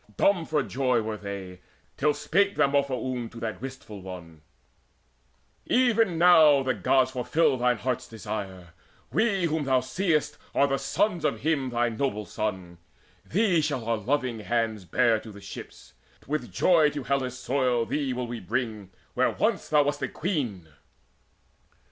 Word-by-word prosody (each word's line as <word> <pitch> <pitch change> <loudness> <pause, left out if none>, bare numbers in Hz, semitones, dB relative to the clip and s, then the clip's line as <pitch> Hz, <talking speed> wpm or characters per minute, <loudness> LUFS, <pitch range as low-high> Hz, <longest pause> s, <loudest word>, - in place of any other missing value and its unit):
Dumb 180 -5 +2
for 150 -3 +1
joy 125 -4 0
were 110 0 -3
they, 100 -3 -7 0.3
Till 150 +1 +1
spake 200 +4 +1
Demophoon 135 -4 0
to 115 - -11
that 110 -4 -4
wistful 130 -6 -8
one: 85 -4 -10 1.3
"Even 225 -8 +3
now 160 -5 +6
the 130 -1 +1
Gods 130 -1 +2
fulfil 130 +4 +1
thine 125 0 +2
heart's 125 0 -2
desire: 100 -5 -6 0.4
We 205 -4 +1
whom 155 -2 -1
thou 130 -1 +3
seest 150 +2 -1 0.2
are 140 - +5
the 135 -1 0
sons 180 0 0
of - - 0
him, 145 -4 0
Thy 120 0 +1
noble 110 -2 -2
son: 95 -6 -4 0.5
thee 185 -3 +2
shall 145 -6 -2
our 115 -1 +1
loving 125 +1 -1
hands 110 -2 -1
Bear 110 +6 +2
to 110 - -11
the 100 - -12
ships: - - -11 0.3
with 150 +2 -3
joy 160 -5 +4
to 145 -2 -5
Hellas' 130 -2 -1
soil 125 -2 0
Thee 140 +3 -1
will 125 0 -2
we 120 0 -5
bring, 110 -1 -3 0.2
where - - +2
once - - -1
thou 150 -1 +5
wast 145 0 -2
a - - 0
queen." 130 - -3
130 Hz, 155 wpm, -27 LUFS, 110-150 Hz, 1.3 s, now